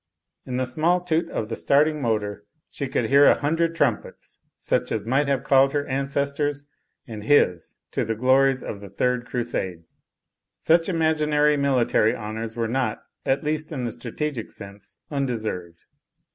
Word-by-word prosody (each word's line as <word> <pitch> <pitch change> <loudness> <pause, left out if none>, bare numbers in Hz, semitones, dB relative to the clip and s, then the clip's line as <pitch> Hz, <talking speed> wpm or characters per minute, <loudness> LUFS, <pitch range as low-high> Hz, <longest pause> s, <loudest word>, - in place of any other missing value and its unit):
In 125 -1 -3
the 130 - 0
small 160 +8 +1
toot 170 -1 -1
of 110 - -3
the 115 - -4
starting 150 +4 +2
motor 105 -4 -1 0.3
she 140 - -4
could 135 - -1
hear 140 +1 +6
a - - +6
hundred 165 +3 0
tnmipets, 140 -9 -2 0.2
such - - -1
as 110 -2 -2
might 135 +5 +1
have 140 -2 0
called 135 0 +4
her 145 -1 0
ancestors 140 +1 -2 0.4
and 110 -3 -8
his 90 - +2
to - - -1
the 115 +1 -2
glories 130 +2 +3
of 100 - -6
the 100 - -9
Third 125 +5 -1
Crusade. 105 -9 -3 0.8
Such 165 +2 +3
imaginary 155 -3 +2
military 125 -5 +2
honours 110 +1 -6
were 115 -1 0
not, 120 -2 -2 0.2
at 135 +1 +1
least 155 +1 -2
in 135 -5 -3
the 120 - -2
strategic 125 +1 -4
sense, 100 0 -12
undeserved. 110 - -3
135 Hz, 160 wpm, -24 LUFS, 115-145 Hz, 0.8 s, hear